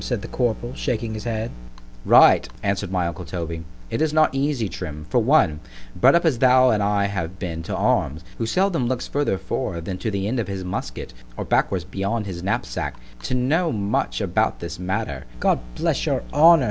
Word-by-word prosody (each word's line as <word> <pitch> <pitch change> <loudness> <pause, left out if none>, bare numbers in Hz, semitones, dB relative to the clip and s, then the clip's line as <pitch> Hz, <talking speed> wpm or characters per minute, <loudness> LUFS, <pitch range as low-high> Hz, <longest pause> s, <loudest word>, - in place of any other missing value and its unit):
said - - -2
the - - -5
corporal, 120 0 -1
shaking 115 -4 -2
his 110 +1 -6
head—— 115 -1 -2 0.5
Right; - - +6
answered 100 -1 -1
my 90 -2 0
uncle 85 +1 -4
Toby, 85 -1 -5 0.3
it 115 - -1
is 160 -1 +2
not 155 -2 +4
easy, 135 -4 0
Trim, 75 -5 -6
for 125 - +4
one, 110 - +3 0.4
bred 135 - +5
up 170 - +3
as 140 -8 +2
thou 130 0 +6
and 105 - +1
I 100 0 +2
have 95 -3 -3
been 85 -3 -4
to 80 - -4
arms, 75 +5 +1 0.2
who 115 - -1
seldom 180 -3 +1
looks 130 0 -2
further 145 -9 0
forward 85 -2 -3
than 95 0 -4
to 110 - -2
the 100 -1 -2
end 120 +3 -1
of 110 - -2
his 95 -1 -4
musket, 90 0 -5 0.2
or - - -3
backwards 95 -3 +1
beyond 100 +4 -2
his 90 -3 -6
knapsack, 95 -9 -2 0.3
to 125 - -2
know 155 +7 +1
much 100 - -1
about - - 0
this 85 0 -6
matter——God 90 - -1 0.2
bless - - 0
your - - 0
honour! 165 +3 +7
105 Hz, 195 wpm, -23 LUFS, 90-125 Hz, 0.5 s, honour